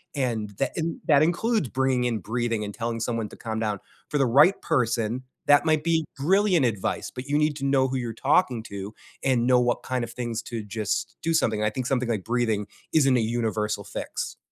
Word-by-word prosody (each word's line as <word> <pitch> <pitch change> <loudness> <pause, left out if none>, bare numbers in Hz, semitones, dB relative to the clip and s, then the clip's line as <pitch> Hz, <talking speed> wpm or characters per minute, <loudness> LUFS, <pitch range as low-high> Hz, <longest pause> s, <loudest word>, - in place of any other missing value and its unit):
And 115 -6 -1
that 135 - +1
and 165 0 -2
that 145 -2 +6
includes 175 - +1
bringing 130 -1 +1
in 115 -3 0
breathing 115 +1 -2
and 105 - -6
telling 115 +1 -3
someone 115 -2 -2
to - - -12
calm 110 -1 -4
down. 105 -3 -1 0.3
For 150 - 0
the 135 - +4
right 145 +11 +5
person, 120 -4 0 0.2
that 145 0 +6
might 155 -2 +2
be 165 -1 +1
brilliant 180 +1 +3
advice, 110 -5 -2
but 125 - -6
you 145 +1 +1
need 150 0 +2
to 140 - -3
know 135 -1 +3
who 130 0 -2
you're 120 -3 -3 0.2
talking 130 -9 +3
to, 100 0 -7 0.3
and 125 -3 +2
know 125 -1 +5
what 120 0 0
kind 130 -1 -2
of 120 - -5
things 120 -1 -3
to 115 -2 -5
just 105 0 -3
do 165 - +1
something. 110 -8 +1
I 105 - +3
think 130 +3 -4
something 125 -2 0
like 110 -5 -1
breathing 115 -4 0 0.3
isn't 135 -4 +4
a - - +2 0.2
universal 105 -2 -1
fix. - - -5
125 Hz, 210 wpm, -25 LUFS, 110-140 Hz, 0.3 s, that